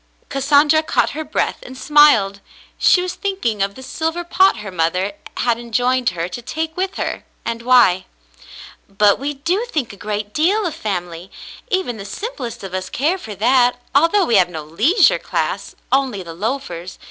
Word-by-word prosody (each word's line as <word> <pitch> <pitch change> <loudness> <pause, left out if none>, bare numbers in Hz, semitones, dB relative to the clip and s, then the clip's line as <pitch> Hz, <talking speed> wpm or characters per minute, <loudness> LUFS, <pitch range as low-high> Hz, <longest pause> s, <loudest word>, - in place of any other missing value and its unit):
Cassandra 290 +3 +3
caught 315 - +1
her 315 +2 -4
breath 305 +2 -2
and 260 +1 -10
smiled. 255 -10 +4 0.4
She 360 - +4
was 365 - -3
thinking 310 - -2
of 200 0 -1
the 260 - -11
silver 325 +6 -3
pot 375 -2 +3
her 210 -2 -7
mother 180 +3 0 0.2
had 235 -1 +1
enjoined 245 +2 +1
her 165 +1 -1
to 185 +7 -7
take 320 +6 -4
with 380 +1 -2
her, - - -3 0.2
and 230 0 -3
why. 235 -7 +4 0.8
"But 200 +1 +3
we 285 +2 -3
do 350 - -1
think 275 - -2
a - - -13
great 210 0 -4
deal 380 - +2
of 335 - -2
family; 180 - -5 0.4
even 375 - -1
the 195 - -8
simplest 245 - -6
of 190 -2 -7
us 185 0 -3
care 325 +8 0
for 215 - -8
that, 245 +4 +3
al 310 +4 +5
though 405 0 +3
we 230 - +3
have 180 -2 +4
no 160 -3 -6
leisure 220 - +3
class - - -3
— - - -38
only 260 -8 +1
the 165 -1 -9
loafers. 185 -3 -4
245 Hz, 180 wpm, -19 LUFS, 200-310 Hz, 0.8 s, al